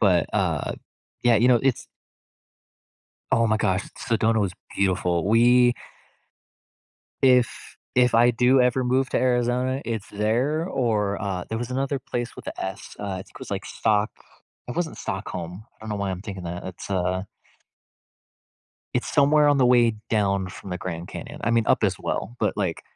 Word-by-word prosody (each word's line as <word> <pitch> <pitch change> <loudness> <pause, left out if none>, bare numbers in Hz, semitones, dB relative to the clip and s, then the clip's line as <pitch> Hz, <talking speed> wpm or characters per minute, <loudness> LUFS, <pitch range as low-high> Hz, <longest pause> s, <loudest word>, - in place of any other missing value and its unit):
But, 95 -5 +4
uh, - - 0 0.5
yeah, 120 -2 +5
you 120 +4 +4
know, 125 - +6
it's 135 -4 +1 1.4
Oh 115 - +3
my 110 0 +2
gosh, 95 -3 0
Sedona 115 -2 +1
was 100 -3 0 0.2
beautiful, 90 -2 +1
we 120 +3 +5 1.5
If 125 -2 +2 0.2
if 125 -2 +4
I 120 +1 +6
do 125 +2 +4
ever 125 +1 +2
move 130 +1 +1
to - - +1
Arizona, 125 +1 +1
it's 110 -3 -4
there 120 +10 0
or, 110 - 0
uh, 95 -3 -3
there 110 - -2
was 120 +1 -4
another 135 +2 -1
place 120 -2 -4
with - - -11
a - - -3
S, 95 0 -7
uh, 100 -2 -4
it - - -12
was, - - -9
like, - - -3
Stock 105 -1 +1 0.6
it 125 - -5
wasn't 170 -3 -2
Stockholm, 95 -1 -5
I - - -39
don't 110 - -6
know 105 - -1
why 100 -1 -2
I'm 95 0 -5
thinking 100 -4 -7
that, 85 +1 -5
that's 95 -1 -8
uh 95 0 0 1.7
it's - - -1
somewhere 145 +1 +5
on 145 - +4
the 130 -2 +4
way 120 -2 +4 0.2
down 100 -3 +1
from 95 +1 -10
the 90 - -2
Grand 85 -1 -5
Canyon, - - -8
I 115 - +1
mean, 115 -1 +3
up - - +3
as - - +2
well, 120 +5 -3
but, 105 - 0
like, 95 -5 -2
115 Hz, 170 wpm, -24 LUFS, 95-125 Hz, 1.7 s, know